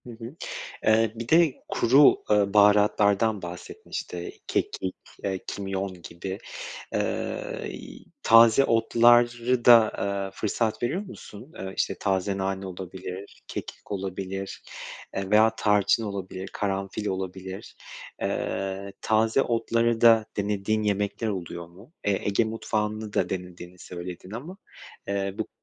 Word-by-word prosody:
Hı - - -10
hı. 115 +4 -9 0.5
Eee, 110 0 +4
bir 115 0 -6
de 160 -4 +5
kuru, 135 +5 +6
ııı, 105 -1 +3
baharatlardan 105 0 +4
bahsettin. 90 0 -9
İşte 85 0 -5
kekik, 95 - -1 0.3
iii, 95 -1 -1
kimyon 95 -2 -4
gibi. 95 +4 -6 0.6
Iıı, - - -2
y - - -9 0.2
taze 115 +3 +7
otları 120 +1 +4
da, 115 -2 +8
ııı, 100 -1 -2
fırsat 110 +2 -1
veriyor 145 +10 0
musun? 155 - -11
Iıı, 95 0 -5
işte - - 0
taze 95 0 0
nane, 95 0 -2
olabilir, 95 +1 -8
kekik - - -7
olabilir, 95 0 -4 0.5
eee, 95 0 -3
veya 110 +1 +6
tarçın 105 +1 +3
olabilir, 95 -2 -5
karanfil 100 +1 -2
olabilir. 95 0 -5 0.5
Iıı, 95 0 -2
taze 110 +4 +3
otları 115 -1 +1
da 115 -2 +6
denediğin, 105 +1 0
yemekler 105 +2 -1
oluyor 85 -4 -4
mu? 100 - -17
Eee, 100 -2 +1
Ege 100 +3 +2
mutfağını 110 -1 -2
da 90 - +1
denediğini 90 -1 -6
söyledin 90 +1 -8
ama, 140 - -7 0.5
eee, 100 -1 -1
bu. - - -2
100 Hz, 125 wpm, -26 LUFS, 95-115 Hz, 0.6 s, da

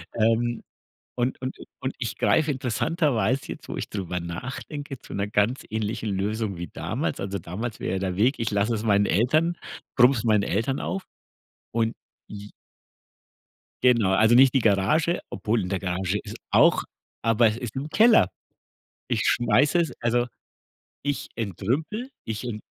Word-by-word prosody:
ähm, 115 +1 +1 0.5
und 125 +1 -1
und 130 - -4
i - - -10 0.2
und - - -2
ich - - -3
greife 155 -1 +3
interessanterweise 135 0 0
jetzt, - - -8
wo - - -3
ich - - -4
drüber 90 -3 -3
nachdenke, 135 - -6
zu - - -11
'ner 100 +1 -1
ganz 105 +5 +1
ähnlichen 110 0 -2
Lösung 105 -1 -2
wie 85 - -5
damals. - - -3
Also, 100 0 -3
damals 105 +7 -5
wäre 95 +1 -1
der 95 -1 -2
Weg, 120 +8 +3
ich 115 -1 -1
lasse 105 +3 +1
es 110 0 -2
meinen 100 -2 +3
Eltern 155 - +2 0.4
brumme 125 +1 +6
es 110 - -2
meinen 105 -3 +3
Eltern 115 +9 0
auf 195 0 -3 0.7
und 115 -1 0 0.3
j 105 0 -9 1.3
Genau, 115 -6 +4
also 110 +4 +5
nicht 130 +1 +7
die 135 - +4
Garage, 110 - +2
obwohl 110 0 -1
in 90 - -3
der 95 0 -1
Garage 95 +1 -1
ist - - -8
auch - - +5 0.4
aber 115 0 +4
es 110 +2 -1
ist 120 -2 -6
im 140 +3 -4
Keller. 215 - +5 0.8
Ich - - +1
schmeiße 125 +8 +3
es 160 -6 -1
also, 120 +1 +1 0.8
ich 145 -2 -2
entrümple, 130 - -2 0.2
ich 110 +1 -4
ent 110 -3 -5
115 Hz, 160 wpm, -25 LUFS, 100-130 Hz, 1.3 s, nicht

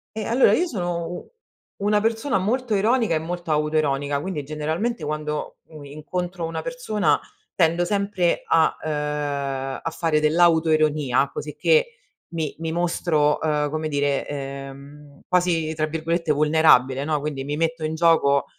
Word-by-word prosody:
Ehm, 215 -1 -3
allora 240 +3 +4
io 355 - +2
sono 175 - -3
u 175 - -8 0.5
una 210 +1 +3
persona 225 +1 0
molto 230 +4 0
ironica 220 -2 +2
e 155 - +1
molto 175 +1 -6
autoironica, 145 -2 0
quindi 175 -5 -4
generalmente 160 +9 -3
quando, 150 0 -4
u 155 -2 -11
incontro 170 +5 -5
una 165 -1 -4
persona 215 -10 0 0.4
tendo 170 0 +2
sempre 200 -3 0
a, 160 -1 +3
ehm, 145 -3 -2
a - - -2
fare 160 -2 0
dell'autoironia 155 -4 +3
cosicché 470 - +1 0.4
mi 160 -3 -2
mi 165 -1 -3
mostro, 165 -3 +1
ehm, 150 -2 0
come 155 0 -2
dire, 145 -1 0
ehm, 140 +1 -8
quasi 170 -3 +1
tra 155 0 -1
virgolette 165 +1 -1
"vulnerabile", 145 -3 +4
no, 150 0 0
quindi 145 -2 -4
mi 145 +2 -3
metto 165 0 -1
in 155 +1 -2
gioco, 160 -4 +3
160 Hz, 140 wpm, -23 LUFS, 150-175 Hz, 0.5 s, allora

